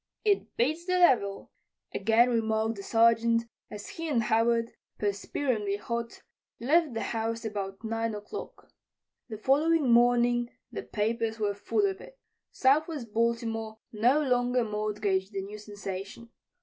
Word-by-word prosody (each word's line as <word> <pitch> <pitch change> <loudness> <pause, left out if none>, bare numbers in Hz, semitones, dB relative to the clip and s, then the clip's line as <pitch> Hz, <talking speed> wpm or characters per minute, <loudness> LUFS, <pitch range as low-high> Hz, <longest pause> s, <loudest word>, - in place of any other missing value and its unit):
"It 410 -2 +1
beats 310 +8 0
the 365 - +1
devil," 255 - +3 0.4
again 225 +4 +3
remarked 220 -1 0
the - - -6
Sergeant 230 +1 +3 0.3
as 210 -1 -8
he 330 -1 -5
and 240 -6 +2
Howard, 230 +1 +2 0.3
perspiringly 205 +1 -1
hot, 235 +2 -5 0.4
left 295 +1 +2
the 225 - -2
house 225 0 -2
about 200 -1 -5
9 225 0 -2
o'clock. 210 0 -9 0.6
The 215 - -5
following 290 +3 +3
morning 240 0 +4 0.2
the - - -4
papers 225 +1 -2
were 205 -2 0
full 305 - 0
of 385 0 -2
it. - - -13 0.3
Southwest 275 -4 +1
Baltimore 225 -1 -1
no 245 +8 +3
longer 245 -2 +2
mortgaged 210 -2 -1
the 195 -1 -3
new 210 +2 -8
sensation. 205 +2 -7
230 Hz, 135 wpm, -28 LUFS, 210-245 Hz, 0.6 s, morning